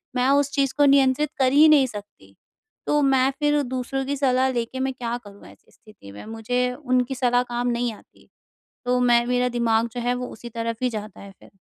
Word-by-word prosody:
मैं 250 0 +1
उस 280 0 +2
चीज़ 275 -2 0
को 290 - +5
नियंत्रित 275 +1 +3
कर 260 -1 +3
ही 300 +2 +7
नहीं 285 -4 +5
सकती, 205 - -12 0.5
तो 295 - +2
मैं 270 -1 +3
फ़िर 295 -1 +2
दूसरों 260 +1 -3
की 285 - -2
सलाह 260 -1 +2
लेके 240 +1 -4
मैं 265 0 -1
क्या 240 -1 -4
करूँ, 205 0 -14
ऐसी - - -20
स्थिति 210 - -16
में? 100 - -11
मुझे 245 +3 -2
उनकी 255 +1 0
सलाह 245 -1 +1
काम 240 +1 -1
नहीं 240 -1 -1
आती। - - -20 0.6
तो 250 0 +1
मैं 240 -1 +3
मेरा 250 0 0
दिमाग 235 -1 0
जो 245 - -4
है 245 +1 0
वो 250 0 -5
उसी 235 +2 -10
तरफ़ 230 +1 -4
ही 250 - +2
जाता 215 -2 -7
है 200 -1 -11
फ़िर। 195 - -21
250 Hz, 210 wpm, -23 LUFS, 235-265 Hz, 0.6 s, ही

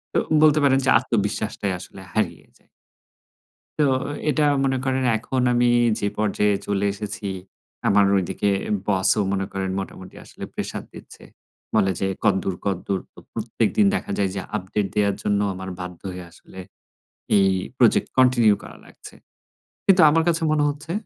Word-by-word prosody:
তো - - +5 0.2
বলতে 155 0 +5
পারেন 135 -1 +4
যে, - - +2
আত্মবিশ্বাসটাই 105 -4 -2
আসলে 95 - -11
হারিয়ে 100 -6 -2
যায়। - - -33 1.1
তো, - - +5 0.5
এটা 150 +1 +2 0.2
মনে 135 -1 +1
করেন 130 0 0
এখন 130 +4 -2
আমি 120 0 +3 0.3
যে 100 - 0
পর্যায়ে 105 -1 +1
চলে 100 0 0
এসেছি, 105 0 -6 0.6
আমার 100 0 +5
ঐদিকে 95 +2 0 0.4
বসও 100 +1 +2
মনে 95 0 -1
করেন 95 -1 -3
মোটামুটি 95 -1 -9
আসলে - - -12
প্রেশার - - -5
দিচ্ছে। - - -13 0.5
বলে 100 -3 +3
যে, 95 - 0 0.2
"কদ্দূর, 95 -3 +1
কদ্দূর?" 95 0 -1
তো - - -14
প্রত্যেকদিন 115 - 0
দেখা - - -4
যায় 100 -2 +1
যে, - - -2 0.2
আপডেট 100 +1 -2
দেয়ার 100 -2 +2
জন্য 100 -1 +1
আমার 95 0 -7
বাধ্য 90 -1 -7
হয়ে 90 -1 -8
আসলে 95 - -14 0.8
এই 95 - +4 0.3
প্রজেক্ট 120 -4 +3
কন্টিনিউ 125 -4 +5
করা - - -11
লাগছে। - - -14 0.7
কিন্তু 190 -3 +6
আমার 165 +2 +3
কাছে 165 0 +1
মনে 150 -1 +2
হচ্ছে, 150 +3 -5
105 Hz, 150 wpm, -23 LUFS, 95-130 Hz, 1.1 s, কিন্তু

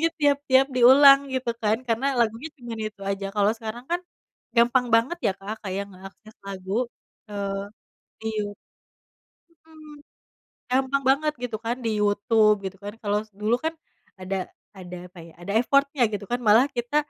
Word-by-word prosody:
lagunya 330 - +3
tiap-tiap 280 -2 +3
diulang 270 +3 +8
gitu 255 -2 -1
kan, 215 0 +2
karena 230 +4 0
lagunya 230 +6 0
cuman 235 -4 -7
itu 210 -2 -24
aja. 195 0 -3
Kalo 205 0 +4
sekarang 225 +2 -7
kan 350 +1 0 0.6
gampang 240 +2 +4
banget 240 +10 +2
ya - - +2
Kak, 210 +3 -7
kayak 195 +1 -3
ngeakses 195 +3 -14
lagu 195 +5 -2 0.4
ke 210 - -10 0.9
iyu 215 -1 -1 1.1
mhm. 310 -2 -16 0.7
Gampang 265 +2 +1
banget 300 +3 +2
gitu 230 -3 -3
kan 235 +2 -1
di 225 - +1
YouTube 210 +1 +3
gitu 190 0 -6
kan, 205 +1 -6
kalo 205 0 0
s - - -32
dulu 210 +3 0
kan 320 - +2 0.5
ada 185 +1 -3 0.4
ada 180 -1 -9
apa 180 0 -17
ya, 165 - -15
ada 185 +3 -5
effort-nya 275 +2 +2
gitu 205 0 -4
kan, 245 +1 0
malah 225 +4 +6
kita 240 +4 -2
230 Hz, 160 wpm, -25 LUFS, 205-265 Hz, 1.1 s, diulang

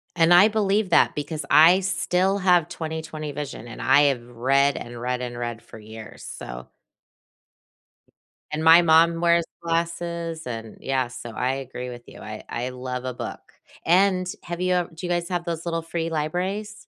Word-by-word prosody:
And 170 0 +5
I 180 +4 +8
believe 210 -2 +1
that - - +4
because 150 0 -4
I 170 +4 +7
still 190 0 0
have 180 -4 +3
20/20, 160 -2 -5
vision, 140 -4 -6
and 115 - -9
I 140 +3 +5
have 135 -4 +1
read, 135 +4 +2
and 120 0 -8
read, 125 +1 -2
and 120 -1 -5
read 120 -1 -5
for 110 - -13
years, 110 0 -11
so - - -8 1.8
And 155 +1 -2
my 165 +2 +8
mom 165 0 +4
wears 170 -1 +3 0.2
glasses 170 0 -3
and 115 -3 -7
Yeah, 130 -2 0
so 120 -1 -9
I 125 +4 -1
agree 130 -2 -6
with 120 -1 -9
you. - - -13
I 110 0 -8
I 125 +2 -3
love 125 0 -5
a 130 - -3
book, - - -8 0.3
and 185 +1 +3 0.2
have 175 +1 -5
you 185 0 +1
ev 175 -2 -1
Do 175 +3 -7
you - - -3
guys 175 0 -1
have 175 -2 -2
those 165 -1 -4
little 165 -1 -1
free 165 0 -3
libraries? 185 +7 -3
160 Hz, 180 wpm, -24 LUFS, 125-175 Hz, 1.8 s, I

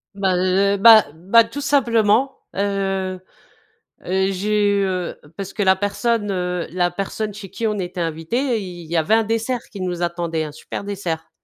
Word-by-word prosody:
Bah, 190 -2 +1
heu, 190 +2 +2
bah 220 +1 +8
bah, 195 +8 +4
tout 285 - -6
simplement, 255 -2 +2 0.2
heu 195 -2 -2 0.8
heu, 190 +1 +1
j'ai 205 +2 +1
eu, - - +2
heu 185 -2 -3 0.2
parce 195 -1 -6
que 210 - -1
la 190 -1 +4
personne, 205 +2 -1
heu, 180 -2 -2
la 175 0 +1
personne 200 +3 -4
chez 200 -1 -9
qui 225 +4 -3
on 210 -1 -1
était 180 -1 -3
invité, 215 - -1
il 180 -3 -8
il - - -12
y 170 - +1
avait 160 +8 +2
un 225 - +4
dessert 230 +3 -1
qui 200 - -9
nous 175 -1 -3
attendait, 170 -2 -1
un 150 - -7
super 160 +5 -7
dessert. 180 -5 -4
195 Hz, 185 wpm, -21 LUFS, 180-215 Hz, 0.8 s, bah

